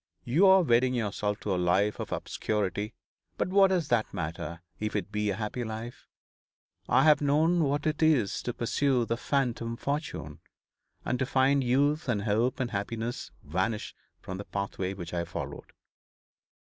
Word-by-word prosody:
You 160 +11 +4
are 190 -1 +7
wedding 125 -2 +3
yourself 105 -2 -1
to 100 - -1
a - - 0
life 95 +4 +2
of - - -5
obscurity; 105 0 -2 0.4
but - - 0
what 195 +1 +6
does 180 -6 0
that 115 -3 +1
matter, 85 +2 -5 0.2
if 105 0 -3
it 105 0 -2
be 105 0 0
a 100 - 0
happy 110 +3 -3
life? 110 +2 -7 0.8
I 130 +2 +5
have 150 -1 +5
known 155 +4 +3
what 145 +1 -1
it 155 +1 0
is 145 -11 +3
to 120 - -3
pursue 125 +1 +1
the 115 - -1
phantom 120 -3 -1
fortune, 145 +4 -4 0.7
and 125 - -1
to 130 - +1
find 135 +1 +3
youth 140 +4 +2
and 105 -4 0
hope 115 +4 +1
and 125 -2 -1
happiness 115 +4 -3
vanish 95 +8 -2 0.3
from 95 0 -7
the 100 - -6
pathway 100 -1 -3
which 85 -2 -7
I 85 -1 0
followed.' - - -7
120 Hz, 165 wpm, -29 LUFS, 105-140 Hz, 0.8 s, are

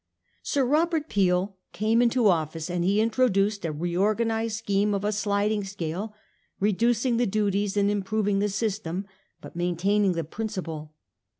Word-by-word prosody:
Sir 275 -2 0
Robert 315 +3 +1
Peel 190 0 +1 0.2
came 220 +3 +2
into 240 -1 +3
office, 165 -1 0
and 175 -1 -1
he 200 +4 +2
introduced 215 -3 +2
a 165 - -1
reorganised 215 +7 0
scheme 205 -1 +1
of 200 +1 -2
a 210 - +1
sliding 205 0 0
scale, 195 +2 -5 0.4
reducing 230 +4 +2
the 240 - +2
duties 205 0 0
and 200 0 +3
improving 205 0 0
the 205 +1 +1
system, 200 -3 -2 0.4
but - - -11
maintaining 180 +3 +1
the 165 -1 -2
principle. 160 -5 -5
205 Hz, 140 wpm, -26 LUFS, 185-220 Hz, 0.4 s, into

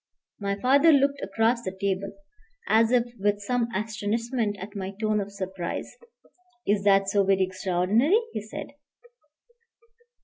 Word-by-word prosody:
My 200 -1 -2
father 280 +8 +5
looked 280 -1 +3
across 225 +4 +1
the 190 -4 -6
table, 195 0 -1 0.6
as 225 +1 +4
if 250 -2 +4 0.2
with 205 +1 +1
some 235 +3 -1
astonishment 220 +1 -2
at 200 +2 -8
my 195 0 -5
tone 215 -1 +1
of 200 0 -6
surprise. 190 -3 -5 0.7
"Is 200 -1 +1
that 195 -1 +4
so 200 0 +2
very 195 0 +3
extraordinary?" 185 - +2 0.2
he - - -3
said. 215 - -8
205 Hz, 135 wpm, -26 LUFS, 195-230 Hz, 0.7 s, father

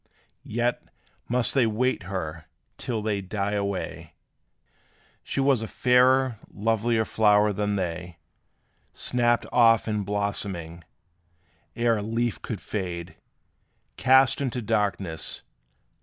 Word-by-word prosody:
Yet, 120 +2 0 0.5
must 125 0 +1
they 130 -4 +3
wait 120 +2 0
her, 80 -4 -4 0.3
till 115 -4 -2
they 105 -2 -1
die 100 +1 -2
away: 100 -2 -3 1.1
She - - -4
was 135 -3 +3
a 110 - -4
fairer, 125 0 +3
lovelier 110 +1 +1
flower 105 -1 +3
than 105 +1 -1
they, 90 -2 -4 0.8
Snapped 120 -1 +1
off 115 -2 +5
in 105 -1 0
blooming! 100 -4 -3 0.9
ere 115 -1 +2
a - - -3
leaf 115 +2 -2
could 110 -6 -5
fade, 90 -4 -5 0.8
Cast 130 +2 +5
into 130 -2 -2
darkness! 100 -7 -2
105 Hz, 110 wpm, -26 LUFS, 100-120 Hz, 1.1 s, off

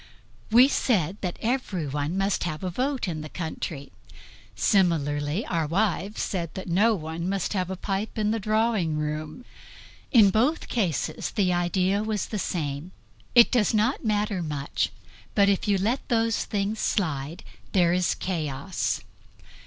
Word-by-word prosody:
We 240 +4 +7
said 200 - +1
that 180 -3 -3
everyone 175 - -1
must 195 0 +1
have 155 0 -4
a 185 - -2
vote 260 +4 -1
in 160 -3 -3
the 155 - -7
country; 160 -4 -5 0.6
similarly 155 -2 +1
our 165 -3 -1
wives 195 +3 0
said 170 -4 -3
that 190 - -6
no 210 +6 +3
one 165 +1 -4
must 195 0 -1
have 185 -2 -1
a 190 - -3
pipe 195 +4 -3
in 210 -1 +1
the 225 - 0
drawing 215 -6 +1
room. 155 +8 -4 0.7
In 215 -7 +7
both 255 - +1
cases 185 - -1
the 185 -4 +1
idea 185 +3 +1
was 215 -2 -1
the 210 - -3
same. 155 -1 -3 0.4
"It 235 -1 +8
does 225 -3 +2
not 220 +6 +1
matter 210 -3 0
much, 145 -3 -2 0.5
but 200 -1 +5
if 200 0 +1
you 200 -1 +3
let 225 +8 -1
those 230 -2 +1
things 205 +1 -2
slide 155 -5 -1 0.3
there 175 -3 +4
is 180 -1 +1
chaos." 155 -2 -2
190 Hz, 150 wpm, -26 LUFS, 160-215 Hz, 0.7 s, It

